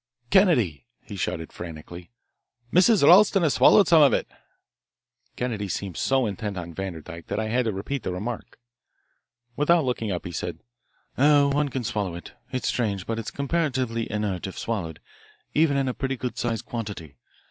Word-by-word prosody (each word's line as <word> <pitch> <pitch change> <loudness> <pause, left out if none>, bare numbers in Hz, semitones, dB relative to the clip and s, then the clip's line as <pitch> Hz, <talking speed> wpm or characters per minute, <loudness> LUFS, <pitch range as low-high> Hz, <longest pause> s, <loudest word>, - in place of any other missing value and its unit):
"Kennedy," 120 - +3 0.2
he - - -9
shouted 80 0 -4
frantically, 85 +1 -9 0.6
"Mrs. 185 +1 +5
Ralston 195 +1 +6
has 155 - +3
swallowed 205 - +6
some 165 -2 +6
of 140 - +6
it." - - 0 1.1
Kennedy 110 -5 -3
seemed 95 -1 -4
so 135 -1 +1
intent 105 -1 -4
on 85 -1 -6
Vanderdyke 85 -3 -7
that 100 - -2
I 110 0 -2
had 125 +2 +1
to 110 - 0
repeat 110 +8 -4
the 95 - -3
remark. 105 +6 -5 1.0
Without 160 +1 +3
looking 115 -4 -2
up, 90 - -4
he 90 - -5
said: 85 - -4 0.6
"Oh, 145 0 +5
one 145 +1 +1
can 130 -1 -3
swallow 105 -6 -2
it 85 - -10 0.2
it's 130 - -2
strange, 100 -6 -1
but 115 0 -3
it 115 - -6
is - - -1
comparatively 130 -6 -1
inert 105 -4 -2
if 95 - -9
swallowed 95 -9 -4 0.5
even 150 -2 +3
in 135 -1 0
a 130 - -1
pretty 135 0 -3
good 125 0 -4
sized 115 -1 -2
quantity. 100 - -6
115 Hz, 170 wpm, -25 LUFS, 95-140 Hz, 1.1 s, Ralston